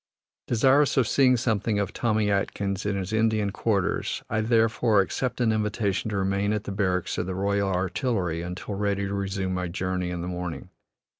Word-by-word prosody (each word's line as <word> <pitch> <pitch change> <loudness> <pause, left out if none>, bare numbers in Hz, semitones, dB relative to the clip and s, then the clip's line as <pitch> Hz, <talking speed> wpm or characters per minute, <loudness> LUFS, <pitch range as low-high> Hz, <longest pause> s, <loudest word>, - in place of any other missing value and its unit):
Desirous 135 +5 +3
of 125 -5 +4
seeing 130 +1 +4
something 110 -2 0
of 100 -1 -1
Tommy 110 -3 +1
Atkins 100 0 -1
in 100 - 0
his 95 +2 -4
Indian 110 -2 +2
quarters, 100 -2 -1
I 110 0 +1
therefore 115 -1 +3
accept 125 +6 -1
an 120 -2 +3
invitation 105 -1 -1
to 105 - -2
remain 100 +2 0
at 105 -1 -2
the - - -5
barracks 95 -3 -1
of 90 - -2
the 95 - -3
Royal 100 +1 0
Artillery 95 - -1
until 90 +4 -5
ready 100 0 -1
to 100 - -3
resume 95 -1 -2
my 90 -1 -2
journey 90 +1 -2
in 90 -1 -4
the 90 - -4
morning. 90 -2 -5
100 Hz, 180 wpm, -26 LUFS, 95-110 Hz, -, of